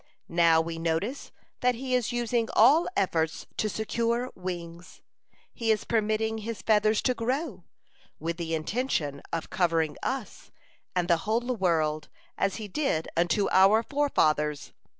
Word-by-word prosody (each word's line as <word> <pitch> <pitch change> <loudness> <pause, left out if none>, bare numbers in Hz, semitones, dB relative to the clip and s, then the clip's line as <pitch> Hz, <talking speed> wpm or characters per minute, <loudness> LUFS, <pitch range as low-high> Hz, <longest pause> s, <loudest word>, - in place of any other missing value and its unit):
Now 165 -1 +4
we 165 0 -5
notice 170 - -2 0.3
that 250 -1 +2
he 255 +2 -4
is 250 -2 +1
using 240 -1 0
all 280 +10 +6
efforts 160 -4 0
to 215 - 0
secure 235 +3 -1
wings. 175 -2 -7 0.5
He 230 -1 -2
is 215 -1 +2
permitting 220 0 0
his 225 +1 -6
feathers 215 0 +3
to 255 - +2
grow, 245 - -3 0.5
with 165 +2 -3
the 165 -2 -2
intention 155 - -2
of 165 -1 -4
covering 165 -4 +1
us 260 -5 -4 0.5
and 180 -1 +1
the 170 -2 +4
whole 240 +3 0
world, 160 -6 0 0.3
as 195 -1 0
he 215 -2 -6
did 200 - -1
unto 175 +4 +2
our 195 +4 +5
forefathers. 155 - 0
210 Hz, 140 wpm, -27 LUFS, 165-235 Hz, 0.5 s, all